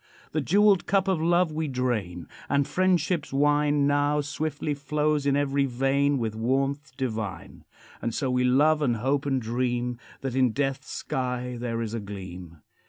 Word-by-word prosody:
The 155 - 0
jeweled 200 +4 +4
cup 195 -1 +2
of 185 -4 +1
love 175 0 +3
we 155 0 -2
drain, 115 -10 -2 0.2
And 140 0 +2
friendship's 180 0 +1
wine 145 +1 +2
Now 145 +1 +2
swiftly 150 +1 -3
flows 150 +1 0
in 140 - +3
every 140 -1 +1
vein 135 +3 +1
With 115 -3 -2
warmth 135 +3 -1
divine. 110 -7 -4 0.4
And 115 - -1
so 130 +2 -1
we 125 0 +2
love 150 +5 +4
and 125 -5 +2
hope 135 +5 0
and 135 -2 +1
dream 120 +1 -2 0.2
That 135 -2 -3
in 130 -3 +2
death's 135 +1 -2
sky 125 -1 -3
there 115 -1 -2
is 110 -1 -5
a 115 - -2
gleam. 90 -5 -9
135 Hz, 165 wpm, -26 LUFS, 120-150 Hz, 0.4 s, jeweled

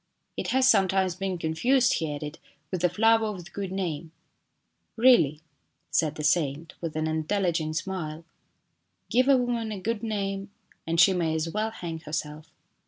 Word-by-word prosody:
" - - -50
It - - -3
has 260 0 +3
sometimes 190 -5 +3
been 190 0 -3
confused," 240 +12 +2
he 160 -3 -2
added, 150 +1 -6 0.2
" - - -43
with 185 -3 -2
the 180 - +3
flower 225 +4 +3
of 190 -5 -6
the 195 - -14
good 195 -2 -5
name." 170 -4 -3 0.4
" - - -49
Really? 225 - +5 0.3
" - - -49
said 155 -2 +1
the 150 - -5
saint, 155 0 0
with 165 -3 -4
an 155 0 0
intelligent 160 0 -1
smile, 165 -3 -4 0.4
" - - -49
give 255 +2 +3
a 275 -1 +6
woman 240 -3 -1
a 205 - -4
good 215 +3 -2
name 195 -3 -3 0.4
and 165 +1 0
she 190 +2 +7
may 165 -3 0
as 160 +1 -1
well 215 +3 -1
hang 170 -7 -6
herself." 155 0 -5
180 Hz, 185 wpm, -27 LUFS, 160-210 Hz, 0.4 s, she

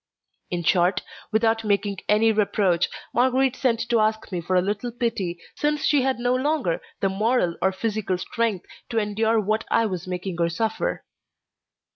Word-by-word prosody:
In 175 -2 -2
short, 180 +2 +2 0.3
without 225 +1 +2
making 200 -2 0
any 220 +2 +4
reproach, 200 -4 +2 0.2
Marguerite 260 +1 +2
sent 235 -4 0
to 235 -1 +3
ask 215 0 0
me 180 -2 -2
for 185 +3 -1
a - - +6
little 205 +5 -2
pity, 225 -8 -2
since 295 0 -1
she 290 -2 +3
had 265 0 +1
no 245 +1 +1
longer 260 - 0 0.2
the 195 - +2
moral 200 -3 +1
or 190 - +3
physical 200 -1 -2
strength 210 0 -2 0.2
to 230 - -3
endure 220 +1 +1
what 215 +2 0
I 230 - +3
was 185 -3 -4
making 180 0 -4
her 170 0 +2
suffer. 220 +6 -2
215 Hz, 165 wpm, -24 LUFS, 185-230 Hz, 0.3 s, a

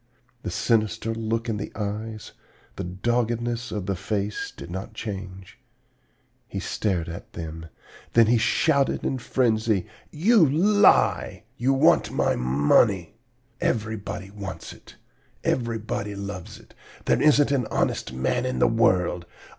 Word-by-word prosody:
The - - -4
sinister 115 0 0
look 115 +1 -2
in 110 -2 -1
the 100 - -5
eyes, 110 +1 -5 0.4
the 95 - -4
doggedness 120 +5 -1
of 105 -3 -3
the 100 0 -1
face 100 +2 -3
did 85 - -10
not 95 +4 -6
change. 95 -4 -7 0.9
He - - -5
stared 95 -6 -1
at 85 +1 -8
them; 80 0 -7 0.5
then 115 -1 +6
he 115 +1 +3
shouted 140 +5 +2
in 130 - -1
frenzy: 110 -6 +1 0.2
'You 195 +6 +4
lie! 190 +9 +3
You 130 +3 +1
want 140 +5 +4
my - - +1
money! 75 - +2 0.5
Everybody 105 -4 -2
wants 100 -2 -7
it! - - -16 0.5
Everybody 110 -3 -2
loves 100 +1 -7
it! 115 - -20 0.3
There - - +2
isn't 145 -1 +5
an 130 -5 +1
honest - - -1
man 65 - 0
in 130 - -2
the - - +4
world! 90 -6 +2
110 Hz, 130 wpm, -25 LUFS, 95-120 Hz, 0.9 s, then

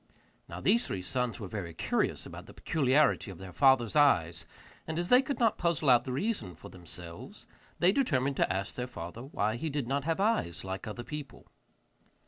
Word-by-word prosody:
Now - - -6
these 235 - +2
three 95 - -4
sons 125 +6 -2
were 105 - -5
very 90 -5 -6
curious - - -1
about - - -10
the - - -13
peculiarity 140 -5 +2
of 95 - -8
their 95 0 -10
father's 130 -4 +4
eyes, 85 - +3 0.4
and 160 0 -3
as 175 +1 -1
they 250 +1 +7
could 275 +1 -3
not 230 -3 +2
puzzle 165 -5 +2
out 120 -1 +5
the 130 - -4
reason 130 - -2
for - - -12
themselves, 85 -1 -10 0.3
they 175 +2 +4
determined 140 - +1
to - - +2
ask 95 +1 -2
their 125 0 -4
father 90 -2 -8
why 110 -4 -2
he 160 +6 -3
did 145 -4 -2
not 140 +2 0
have 165 +2 0
eyes 205 - 0
like 95 +2 -5
other 115 +3 -6
people. 150 +1 -8
125 Hz, 195 wpm, -30 LUFS, 95-160 Hz, 0.4 s, they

